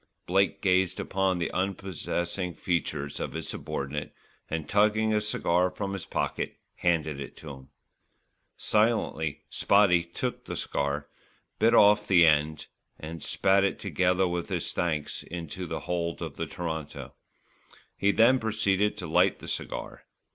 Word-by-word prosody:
Blake 95 +4 +1
gazed 95 -1 +2
upon 95 -1 0
the 85 - -2
unprepossessing 90 -2 -2
features 75 -5 -2
of - - -4
his - - -4
subordinate, 70 +2 -4 0.3
and 80 -2 -3
tugging 110 +1 +3
a 105 - +2
cigar 90 -4 +1
from 95 +2 -4
his 95 -3 -5
pocket, - - -2 0.2
handed 80 -4 0
it 70 - -8
to 75 - -8
him. 65 0 -12 0.9
Silently 105 -9 +1
"Spotty" 95 -4 +4
took 105 +9 -4
the - - -5
cigar, 70 0 -2 0.5
bit 115 +2 +4
off 105 0 +6
the 90 -4 +6
end 75 -1 +2 0.3
and 80 +1 -7
spat 95 0 +3
it 100 - +1
together 90 0 +1
with 85 -1 -3
his - - -1
thanks 80 -4 -1
into 90 +2 -6
the - - -4
hold 85 -1 -2
of - - -5
the - - -3
Toronto. 80 -4 -5 0.8
He 100 - +1
then 120 +6 +5
proceeded 105 -2 +1
to 95 - -5
light 80 - +3
the - - -11
cigar. - - -5
90 Hz, 145 wpm, -28 LUFS, 80-100 Hz, 0.9 s, off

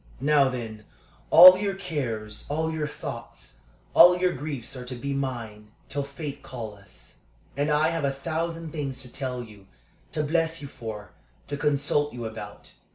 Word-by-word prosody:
"Now, 140 0 +4
then, 110 -4 -6 0.4
all 185 +2 +11
your 200 -1 -1
cares, 120 - -4
all 160 +2 -1
your 155 -1 -2
thoughts, 120 - -8 0.3
all 180 0 +8
your 180 0 +1
griefs 140 -3 -6
are 125 - -6
to 125 +1 -6
be 140 +3 -4
mine 115 -6 -5 0.2
till 145 - -2
fate 140 +1 -7
call 115 -5 -7
us. 100 -2 -13 0.4
And 145 +2 0
I 150 +1 +3
have 165 -2 -2
a - - +2
thousand 165 +3 -3
things 135 -4 -4
to 125 - -11
tell 125 -3 -4
you, 105 -4 -15 0.5
to 150 - 0
bless 165 +2 0
you 145 - -7
for, 110 -5 -8 0.4
to 145 - -2
consult 145 0 +1
you 120 -1 -6
about. 110 -2 -8
140 Hz, 165 wpm, -26 LUFS, 115-155 Hz, 0.5 s, all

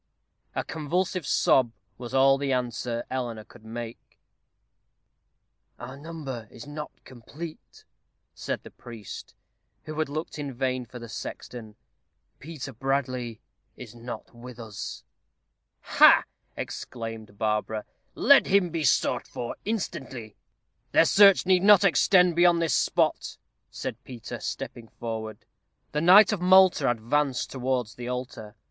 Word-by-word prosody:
A - - -1
convulsive 165 +2 -2
sob 125 -4 +3 0.3
was 120 -2 -7
all 135 +1 +4
the 140 -1 -1
answer 120 -2 -2
Eleanor 120 -4 -3
could 105 - -18
make. 115 +1 -8 1.6
"Our 125 +2 -8
number 140 -6 -7
is 115 - -11
not 150 +1 -6
complete," 145 +6 -11 0.5
said - - -4
the - - -12
priest, 110 -6 -10 0.5
who 155 0 -6
had 155 - 0
looked 155 +1 -5
in 140 -3 -5
vain 130 -1 -2
for 125 - -10
the 120 -1 -9
sexton. 110 -1 -8 0.6
"Peter 145 -3 -7
Bradley 125 -2 -2 0.4
is 120 -4 -10
not 120 +1 -9
with 120 0 -11
us." 110 -3 -7 0.8
"Ha!" - - +6 0.3
exclaimed 115 -3 -7
Barbara. 105 0 -1 0.3
"Let 280 +3 +6
him 190 -3 +3
be 165 -1 -2
sought 130 - +2
for 120 -1 -5
instantly." 130 - -4 0.6
"Their - - +6
search 200 -2 +6
need 185 -1 +4
not 205 0 +7
extend 180 0 +4
beyond 175 0 +5
this 165 -6 +1
spot," - - +1 0.3
said 125 +1 -6
Peter, 120 -3 -8
stepping 115 -2 -6
forward. 110 -2 -6 0.5
The 150 - -1
knight 195 +6 +7
of 195 - -3
Malta 185 -6 +5
advanced 125 +4 0
towards 125 -3 -2
the 120 0 -8
altar. 125 -4 -6
130 Hz, 125 wpm, -26 LUFS, 115-155 Hz, 1.6 s, not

